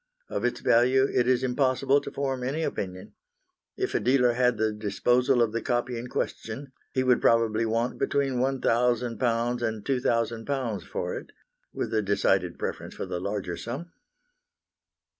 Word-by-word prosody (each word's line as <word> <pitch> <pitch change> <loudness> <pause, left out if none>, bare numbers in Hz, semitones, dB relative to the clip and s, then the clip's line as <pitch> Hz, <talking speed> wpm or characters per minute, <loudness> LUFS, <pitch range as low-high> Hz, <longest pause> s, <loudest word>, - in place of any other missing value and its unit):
Of - - -3
its 120 - -1
value 130 +3 +4
it 125 - +2
is 130 0 +3
impossible 135 +2 +2
to - - -7
form 135 -2 -2
any 145 +6 -1
opinion. 95 -9 -4 0.6
If - - -1
a - - +2
dealer 125 -1 +3
had 125 -1 +2
the 110 0 +1
disposal 120 +4 +2
of 110 - 0
the 115 +1 -2
copy 120 0 -1
in 120 +1 -5
question, 125 +2 -4 0.2
he 130 - +1
would 125 -1 +3
probably 115 -1 +3
want 115 +2 -1
between 135 -2 0
£1,000 120 -2 +1
and 110 -3 -2
£2,000 120 -2 -1
for - - -3
it, - - -8 0.4
with - - -4
a 110 - +3
decided 100 0 +1
preference - - -5
for - - -4
the 90 - -4
larger 95 -2 -3
sum. 135 - -6
120 Hz, 155 wpm, -27 LUFS, 115-130 Hz, 0.6 s, value